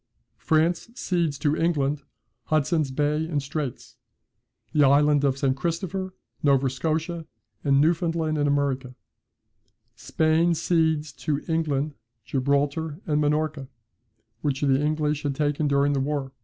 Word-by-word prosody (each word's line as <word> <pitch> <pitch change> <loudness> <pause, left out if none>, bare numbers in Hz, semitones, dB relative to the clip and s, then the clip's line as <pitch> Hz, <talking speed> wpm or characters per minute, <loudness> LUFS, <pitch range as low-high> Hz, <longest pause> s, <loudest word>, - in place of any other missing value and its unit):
France 165 +6 +1
cedes 170 - -1
to 145 +1 +1
England 150 -4 0 0.4
Hudson's 155 -1 +1
Bay 150 +3 0
and 155 -3 -1
Straits, 140 -1 -5 0.8
the 150 - +4
Island 145 +1 +4
of 135 -1 +2
St. 135 -2 +1
Christopher, 185 +5 -3 0.3
Nova 135 -2 +3
Scotia, 160 +4 -2 0.4
and 140 -1 +3
Newfoundland 165 0 +1
in 145 -1 +1
America, 135 -3 0 1.0
Spain 160 +2 +2
cedes 160 -3 +1
to 150 -2 -3
England 155 -3 0 0.3
Gibraltar 140 +3 0
and 150 -1 +1
Minorca, 150 -2 0 0.7
which 140 -2 -1
the 135 -1 +3
English 150 -1 0
had 140 -2 -2
taken 150 +1 0
during 140 0 +2
the 140 - 0
war. 140 -1 -2
150 Hz, 125 wpm, -25 LUFS, 140-160 Hz, 1.0 s, the